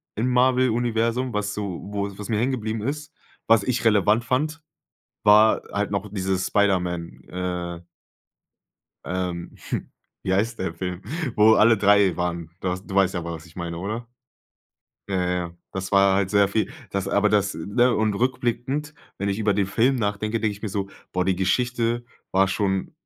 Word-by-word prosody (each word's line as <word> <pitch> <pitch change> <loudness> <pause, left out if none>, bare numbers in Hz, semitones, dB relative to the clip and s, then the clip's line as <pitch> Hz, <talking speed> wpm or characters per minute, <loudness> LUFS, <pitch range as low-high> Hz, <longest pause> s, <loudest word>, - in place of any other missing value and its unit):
im 115 +4 0
Marvel 130 0 +4
Universum, 120 +2 0
was 105 0 -1
so 100 -5 -4
wo 100 -1 -3
was 105 - -7
mir 110 -2 +1
hängen 125 +4 +1
geblieben 110 -3 -3
ist, 150 +4 -4 0.3
was 115 -2 +5
ich 125 0 -1
relevant 105 +1 +4
fand, 155 +6 -1 0.6
war 105 +1 +6
halt 100 0 -1
noch 100 +1 -2
diese 95 -1 0
Spiderman, 90 -3 0
äh 90 -1 -4 1.2
ähm, 90 -1 -3
hm, - - -3 0.3
wie 95 - 0
heißt 115 +5 0
der 95 -3 -2
Film, 90 +1 -5 0.3
wo 110 +1 +6
alle 115 +1 +5
3 100 -2 +4
waren. 85 -2 -2
Du 95 - -2
hast 90 +1 -3
du - - -8
weißt 95 -1 +4
ja, 90 - -2
was 85 -1 -6
ich 85 - -18
meine, 85 -1 -4
oder? 110 +6 -4 1.0
Ja, 90 -2 0
ja. 90 -1 -2 0.2
Das 95 0 -4
war 100 -1 +5
halt 95 -1 +1
sehr 100 0 +4
viel. 110 +5 -1 0.2
Das 100 -1 -2
aber 105 +1 +2
das, 100 -1 +2
ne 120 +8 +2
und 110 -1 +1
rückblickend, 130 +5 -1 0.2
wenn 100 +1 -1
ich 100 +2 -2
über 105 -2 +2
den 100 0 +1
Film 120 +7 +2
nachdenke, 110 0 -1
denke 110 -1 0
ich 100 - -13
mir 110 - -3
so: 100 0 -3 0.2
„Boah, 90 0 0
die 95 - +2
Geschichte 120 +5 0 0.3
war 95 +1 +4
schon" 95 -1 -1
100 Hz, 175 wpm, -24 LUFS, 95-115 Hz, 1.2 s, war